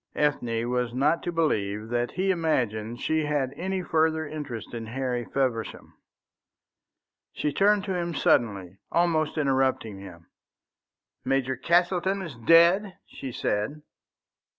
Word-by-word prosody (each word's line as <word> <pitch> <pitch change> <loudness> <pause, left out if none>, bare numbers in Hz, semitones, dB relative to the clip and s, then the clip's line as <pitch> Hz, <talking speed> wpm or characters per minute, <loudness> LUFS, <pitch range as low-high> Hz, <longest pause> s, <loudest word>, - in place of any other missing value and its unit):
Ethne 120 -6 0
was 125 -1 -1
not 150 +6 +2
to 175 - -3
believe 110 -10 -1
that 120 0 0
he 190 +2 +1
imagined 120 - -1
she 155 +3 0
had 145 -3 -1
any 190 +1 -3
further 160 -1 +1
interest 140 -8 -6
in 115 -1 -5
Harry 125 0 -2
Feversham. 125 -5 -2 1.4
She 150 - -2
turned 205 +2 +3
to 190 -2 -2
him 170 -2 -2
suddenly, 100 -9 +1
almost 165 -3 +1
interrupting 130 -7 0
him. 90 -4 -12 1.0
"Major 130 -1 0
Castleton 180 +6 +1
is 165 -5 -7
dead?" 170 - +4
she 135 - -8
said. 115 +7 -2
140 Hz, 125 wpm, -26 LUFS, 120-170 Hz, 1.4 s, dead